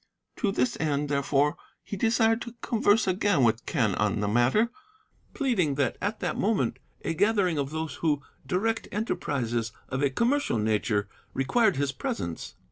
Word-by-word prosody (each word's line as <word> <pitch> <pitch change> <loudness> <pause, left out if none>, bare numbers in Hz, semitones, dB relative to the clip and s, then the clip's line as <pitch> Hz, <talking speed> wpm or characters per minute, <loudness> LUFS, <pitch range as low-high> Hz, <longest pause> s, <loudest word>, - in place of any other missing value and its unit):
To 205 -5 +1
this 125 -9 0
end, 145 -2 0
therefore, 140 +1 +1 0.3
he - - -5
desired 225 +2 +2
to 235 0 -7
converse 220 -1 +3
again 185 -5 +2
with 115 0 +2
Quen 115 - +1
on 105 +2 0
the 105 - 0
matter, 120 - +3 0.6
pleading 205 - +1
that 140 -3 +1
at 205 +2 -2
that - - -1
moment 135 - +1 0.2
a - - -1
gathering 190 -3 +2
of 140 -1 -1
those 160 -1 -3
who 150 -3 0 0.2
direct 225 +5 -1
enterprises 120 - -1 0.2
of 130 +1 -2
a 140 - +3
commercial 240 - +1
nature 105 -1 +1 0.3
required 220 - +3
his 140 0 0
presence. 85 -10 -4
150 Hz, 155 wpm, -27 LUFS, 125-210 Hz, 0.6 s, converse